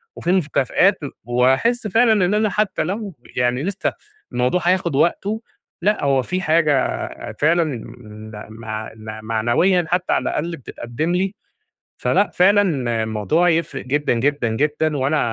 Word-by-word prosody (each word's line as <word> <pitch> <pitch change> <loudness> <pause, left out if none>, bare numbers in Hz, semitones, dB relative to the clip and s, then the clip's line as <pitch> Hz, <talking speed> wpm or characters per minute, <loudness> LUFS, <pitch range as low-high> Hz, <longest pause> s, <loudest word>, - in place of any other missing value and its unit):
وفي 175 - -1
مكافآت، 180 - +2 0.2
وهاحس 130 - +2
فعلًا 220 -2 +4
إن 185 - +1
أنا 215 0 +2
حتّى 210 +2 0
لو 200 +1 -4 0.2
يعني 125 +2 +1
لسّه 195 +3 -2 0.4
الموضوع 125 +8 +1
هياخد 175 -3 +1
وقته، 200 +8 +1 0.4
لأ، 210 +4 +1
هو 135 -2 +3
في 185 +8 -3
حاجة 155 -5 +1 0.3
فعلًا 165 +3 +3
م 110 -6 -8 0.2
مع 110 -1 -6 0.3
معنويًا 120 - +2
حتّى 180 +1 0
على - - +1
الأقل 165 +2 -2
بتتقدم 130 +5 -4
لي. 190 +3 -1 0.6
فلأ، 205 - +2
فعلًا 200 +3 +5 0.4
الموضوع 110 - +1
يفرق 155 -5 -1
جدًا، 145 +2 +1
جدًا، 130 +1 0
جدًا، 150 +5 0
وأنا 135 +4 +1
155 Hz, 135 wpm, -20 LUFS, 125-185 Hz, 0.6 s, فعلًا